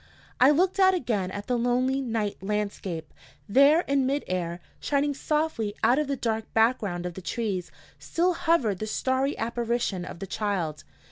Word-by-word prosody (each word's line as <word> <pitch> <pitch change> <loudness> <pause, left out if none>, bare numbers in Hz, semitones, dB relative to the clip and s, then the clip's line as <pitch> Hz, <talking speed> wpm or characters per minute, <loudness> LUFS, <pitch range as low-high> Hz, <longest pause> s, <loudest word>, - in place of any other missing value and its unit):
"_ - - -28 0.4
I 255 - +7
looked 365 +6 +2
out 380 -1 +6
again 220 - -1
at 205 +2 -6
the 250 -1 0
lonely 255 +3 +1
night 225 -5 -2
landscape. 195 -5 -3 0.3
There, 280 +9 +6
in 275 -5 +1
mid 280 +2 0
air, 175 -1 -3 0.2
shining 285 0 0
softly 290 -8 -1
out 255 +4 +4
of 300 - 0
the 280 - -1
dark 225 -3 -2
background 220 -6 +2
of 180 - -4
the 190 - -8
trees, 195 -3 -3 0.3
still 360 +2 +1
hovered 325 - +1
the 215 - -3
starry 260 +5 0
apparition 235 -4 -1
of 175 - -8
the 195 - -6
child. 190 -6 -2
235 Hz, 175 wpm, -27 LUFS, 200-280 Hz, 0.4 s, I